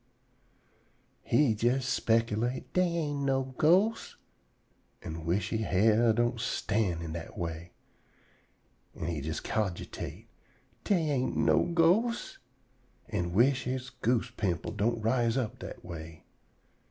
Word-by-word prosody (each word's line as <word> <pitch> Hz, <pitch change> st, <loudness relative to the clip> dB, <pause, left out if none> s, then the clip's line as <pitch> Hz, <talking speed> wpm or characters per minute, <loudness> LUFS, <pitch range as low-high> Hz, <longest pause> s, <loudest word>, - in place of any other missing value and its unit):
He 130 Hz, +1 st, +3 dB
jes 120 Hz, +4 st, +1 dB
speculate, 115 Hz, +2 st, 0 dB
"Dey 180 Hz, 0 st, +3 dB
ain't 145 Hz, -3 st, -2 dB
no 135 Hz, -1 st, 0 dB
ghosts," 190 Hz, +8 st, +3 dB, 0.9 s
an' 80 Hz, 0 st, -6 dB
wish 90 Hz, +5 st, 0 dB
he 110 Hz, -, -1 dB
hair 110 Hz, +3 st, +3 dB
don't 120 Hz, +1 st, +1 dB
stand 105 Hz, -6 st, -1 dB
on -, -, -5 dB
ind 80 Hz, -, -5 dB
dat 85 Hz, -1 st, -7 dB
way. 85 Hz, 0 st, -5 dB, 1.2 s
An' -, -, -5 dB
he 85 Hz, -2 st, -2 dB
jes 80 Hz, +2 st, -3 dB
cogitate, 100 Hz, -5 st, -4 dB, 0.6 s
"Dey 165 Hz, -7 st, +2 dB
ain't 130 Hz, -2 st, 0 dB
no -, -, +3 dB
ghosts," 180 Hz, +8 st, +2 dB, 0.7 s
an' 85 Hz, 0 st, -2 dB
wish 125 Hz, +6 st, +3 dB
he 130 Hz, +1 st, -1 dB, 0.2 s
goose 120 Hz, +1 st, +1 dB
pimples 105 Hz, -1 st, -2 dB
don't 115 Hz, +3 st, +1 dB
rise 115 Hz, +1 st, +2 dB
up 120 Hz, -5 st, -2 dB
dat -, -, -9 dB
way. 80 Hz, -1 st, -9 dB
115 Hz, 125 wpm, -30 LUFS, 90-135 Hz, 1.2 s, He